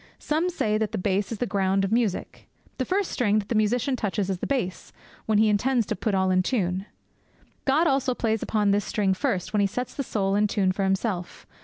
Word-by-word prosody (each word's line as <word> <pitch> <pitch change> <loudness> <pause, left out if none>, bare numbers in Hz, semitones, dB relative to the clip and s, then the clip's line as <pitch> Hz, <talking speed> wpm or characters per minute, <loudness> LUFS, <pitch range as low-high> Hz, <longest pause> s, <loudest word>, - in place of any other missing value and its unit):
Some 320 +4 0
say 215 -11 0
that 220 0 -2
the - - -1
bass 195 +2 0
is 225 - -3
the 245 - -1
ground 195 -2 +1
of 195 - -4
music. 225 -5 -1 0.3
The 260 - 0
first 385 +4 0
string 215 -4 +2
that 210 -1 -2
the - - 0
musician 230 +5 +1
touches 205 -4 -1
is 185 - -3
the - - -3
bass, 240 -10 -2 0.4
when 215 -1 +3
he 215 +1 +5
intends 230 +3 +2
to - - -2
put 200 +2 -1
all 190 0 +2
in 185 0 +4
tune. 190 -3 -1 0.8
God 290 +5 +3
also 270 -4 +1
plays 225 -2 0
upon 210 -2 +1
this 205 +1 +2
string 195 -2 0
first, 185 0 -2
when 210 - +3
He 200 - +3
sets 250 +5 -4
the - - -3
soul 195 -6 -1
in 210 +1 +3
tune 195 -2 +1
for 195 +1 -2
Himself. 190 -2 -2
210 Hz, 225 wpm, -25 LUFS, 195-245 Hz, 0.8 s, he